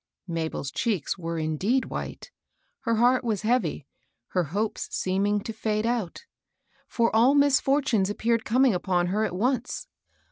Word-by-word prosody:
Mabel's 160 -5 -3
cheeks 205 - -1
were 165 -1 -3
indeed 165 - 0
white. - - -6 0.5
Her 230 -2 0
heart 245 +3 +3
was 220 -3 -1
heavy, 215 - 0 0.4
her 180 -2 0
hopes 205 +9 -2
seeming 200 +2 0
to 225 - -6
fade 215 0 -1
out; 230 -7 -2 0.6
for 230 -2 +1
all 245 +5 +5
misf(H*tunes 275 -7 +3
appeared 230 +2 0
coming 255 +1 +3
upon 180 -1 0
her 215 +1 +1
at 180 - -4
once. 245 +4 -1
215 Hz, 140 wpm, -26 LUFS, 180-240 Hz, 0.6 s, all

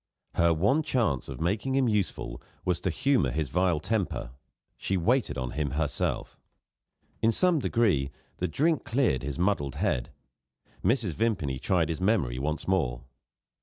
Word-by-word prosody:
Her 85 0 +3
one 100 - +3
chance 115 - 0
of 65 -2 -6
making 100 +10 0
him 135 -2 +3
useful 105 -4 -1 0.2
was 90 -1 0
to - - 0
humour 135 - +2
his 80 -4 -2
vile 90 0 +2
temper; 95 - -2 0.4
she 95 - -1
waited 120 - +1
on 65 -1 -3
him 75 0 -1
herself. 75 -1 -2 0.8
In 115 - +4
some 175 +7 +3
degree, 100 - +2 0.3
the 90 - -1
drink 155 - +1
cleared 120 - +1
his 70 +1 -4
muddled 85 -7 0
head. - - 0 0.7
Mrs. 115 -6 +2
Vimpany 85 - 0
tried 85 -2 +1
his 80 +2 -3
memory 90 - +1
once 75 +3 -2
more. 70 -11 0
90 Hz, 150 wpm, -28 LUFS, 75-115 Hz, 0.8 s, In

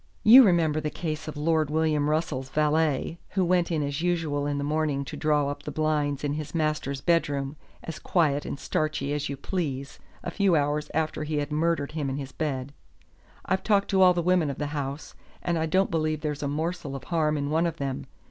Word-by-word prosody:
You 240 +5 +10
remember 165 - +3
the 150 - -2
case 155 -1 -4
of 155 - -6
Lord 155 0 +1
William 150 -1 +1
Russell's 150 -4 -1
valet, 155 +2 +1 0.2
who 185 - +4
went 175 0 +2
in 155 -3 0
as 140 +2 -3
usual 160 -5 0
in 145 -1 -1
the 140 - -2
morning 150 -2 0
to 145 - -7
draw 150 -2 +1
up 145 0 -5
the - - -6
blinds 150 -2 0
in 145 -1 0
his 155 +2 -5
master's 150 -4 -1
bedroom, 145 -4 0 0.3
as 165 - -6
quiet 150 -5 +1
and 140 - -5
starchy 155 -2 -1
as 150 0 -2
you 140 - -4
please, 140 -4 -4 0.2
a 175 - -4
few 195 -1 +2
hours 145 0 0
after 155 -1 -1
he 155 0 -3
had 145 0 -2
murdered 160 -1 0
him 150 -3 -2
in 135 - -3
his 135 -1 -6
bed. 140 -2 -3 0.7
I've 190 0 0
talked 200 -2 +2
to 190 -1 +3
all 180 -1 +7
the 175 - 0
women 180 -3 +3
of 140 - -4
the 145 - -2
house, 140 0 -4 0.3
and 175 - 0
I 160 - 0
don't 190 +4 +2
believe 155 -2 0
there's 150 -2 -3
a 145 - -1
morsel 150 -1 -3
of 135 - -7
harm 155 -3 0
in 145 0 -2
one 165 +2 +2
of 165 -1 -4
them. 135 -3 -4
155 Hz, 215 wpm, -27 LUFS, 145-165 Hz, 0.7 s, You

